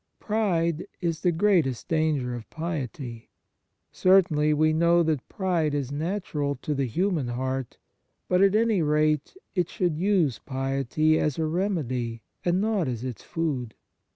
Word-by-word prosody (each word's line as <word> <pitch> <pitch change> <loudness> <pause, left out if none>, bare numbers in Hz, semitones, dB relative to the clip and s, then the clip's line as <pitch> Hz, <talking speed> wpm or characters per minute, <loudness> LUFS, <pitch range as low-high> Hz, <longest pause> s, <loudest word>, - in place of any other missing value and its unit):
Pride 175 -7 0
is 170 -3 -2
the 180 - +3
greatest 165 - +2
danger 155 -6 0
of 120 -2 -7
piety. 135 -7 -5 0.6
Certainly 170 -5 +4
we 155 +1 +3
know 170 +1 +4
that 155 -5 -1
pride 175 -7 0
is 140 -2 -2
natural 150 -2 -2
to 150 - -1
the 135 -2 0
human 170 - 0
heart; 130 +1 -3 0.5
but, 180 0 +3
at 195 +1 +5
any 220 -4 +3
rate, 150 - +1 0.2
it 180 -3 0
should 175 -4 -1
use 180 - +2
piety 135 +3 0
as 150 -3 0
a 160 - 0
remedy, 140 - -2 0.2
and 175 +1 +2
not 205 -5 +1
as 120 -2 -3
its 125 -3 -5
food. 135 -9 -3
155 Hz, 145 wpm, -26 LUFS, 135-180 Hz, 0.6 s, at